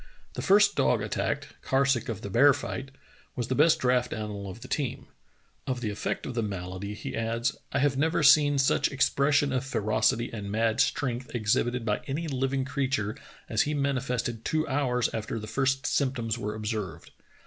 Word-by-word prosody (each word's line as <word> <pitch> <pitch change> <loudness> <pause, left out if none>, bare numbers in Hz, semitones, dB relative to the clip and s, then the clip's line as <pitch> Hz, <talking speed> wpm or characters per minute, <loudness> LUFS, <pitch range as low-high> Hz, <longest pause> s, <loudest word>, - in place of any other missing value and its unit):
" - - -31
The - - -4
first 205 +1 +5
dog - - +2
attacked, - - -2
Karsuk 135 -3 +1
of 110 -5 -4
the 100 - -6
bear 140 +7 +6
fight, 135 -1 -5 0.5
was 120 -2 -3
the - - +1
best 155 +4 +5
draught 125 -1 +1
animal 105 -2 -5
of 110 +5 -9
the 130 - -9
best - - 0
team. 140 -5 -4 0.6
Of 130 -2 -1
the 110 -3 -2
effect 100 - -3
of - - -4
the 115 - -1
malady 100 0 -5
he - - -6
adds: 115 +3 -1 0.2
I - - 0
have 140 -1 +2
never 160 +2 +1
seen 145 0 +6
such 135 0 +3
expression 140 +1 +2
of 130 0 0
ferocity 115 -1 +1
and 105 -3 -5
mad 110 +1 +1
strength 125 -2 0
ex 110 -3 +2
hibited 120 -1 0
by 105 -2 0
any 155 +5 -2
living 135 -1 -1
creature 135 -6 -1 0.3
as 110 - +1
he 150 +1 0
manifested 125 -4 -1
two 155 0 0
hours 130 -4 +1
after 110 +1 -3
the 110 - -5
first 135 +4 0
symptoms 125 -5 0
were 105 -3 -4
observed. 105 -2 -4
125 Hz, 190 wpm, -28 LUFS, 110-140 Hz, 0.6 s, bear